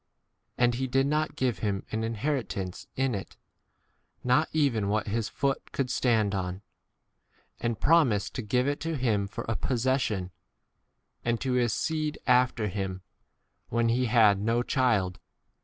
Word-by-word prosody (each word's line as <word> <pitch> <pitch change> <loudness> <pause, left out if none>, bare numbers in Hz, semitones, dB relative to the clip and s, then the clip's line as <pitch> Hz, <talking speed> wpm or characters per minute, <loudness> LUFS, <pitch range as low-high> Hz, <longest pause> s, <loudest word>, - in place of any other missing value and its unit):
And 120 0 +3
he 130 +2 -2
did 135 +1 +2
not 155 +2 0
give 125 -6 0
him 100 -2 -2
an 110 +1 -1
inheritance 115 - -3
in 135 -1 +1
it, 100 -2 -6 0.9
not 125 +6 +3
even 125 -10 +1
what 110 +1 0
his 110 0 -2
foot 140 -1 -2
could 130 -2 -1
stand 110 -6 +2
on; 95 0 -3 1.0
and 115 -2 -2
promised 130 -11 +3
to - - -3
give 125 +4 +1
it 145 0 -1
to 165 -1 -2
him 110 -6 +1
for 105 - -6
a 110 - 0
possession, 120 -7 0 0.9
and 120 -1 0
to 130 - -1
his 125 -2 +2
seed 155 -2 -1
after 125 -3 +3
him, 95 -1 -4 0.7
when 115 0 +1
he 125 +2 +2
had 110 -4 +5
6 - - -4
no 115 +2 +1
child. 105 -10 +1
120 Hz, 155 wpm, -28 LUFS, 105-130 Hz, 1.0 s, had